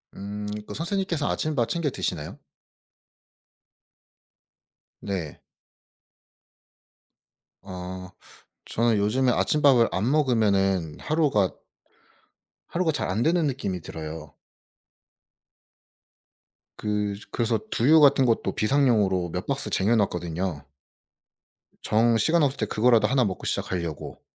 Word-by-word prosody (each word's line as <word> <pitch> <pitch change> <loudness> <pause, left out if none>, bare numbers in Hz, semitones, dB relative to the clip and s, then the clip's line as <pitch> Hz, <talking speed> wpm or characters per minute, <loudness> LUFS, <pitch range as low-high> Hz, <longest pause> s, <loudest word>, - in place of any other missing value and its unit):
음 100 +1 -6 0.2
그 - - -7
선생님께서 170 - -2
아침밥 150 -7 -1
챙겨 165 0 -1
드시나요? 80 - -4 2.6
네. 90 -7 -5 2.2
아 90 -1 -8 0.6
저는 115 -1 +1
요즘에 125 +5 +2
아침밥을 135 -4 +3
안 105 +7 0
먹으면은 100 - +1
하루가 145 - +1 1.2
하루가 170 -2 0
잘 145 - -3
안 105 +5 0
되는 170 0 +2
느낌이 100 -10 -3
들어요. 80 0 -8 2.4
그 105 -1 -2 0.2
그래서 115 -2 0
두유 155 +7 +5
같은 140 -2 +5
것도 115 -2 0
비상용으로 105 -8 +2
몇 90 +2 -4
박스 140 0 -2
쟁여 105 +5 +2
놨거든요. 90 -5 -2 1.2
정 115 +1 +2
시간 160 +9 +2
없을 140 -1 0
때 110 - -1
그거라도 110 0 +3
1 130 0 +2
먹고 95 -2 -4
시작하려고. 85 -4 -4
110 Hz, 220 characters per minute, -25 LUFS, 95-135 Hz, 2.6 s, 두유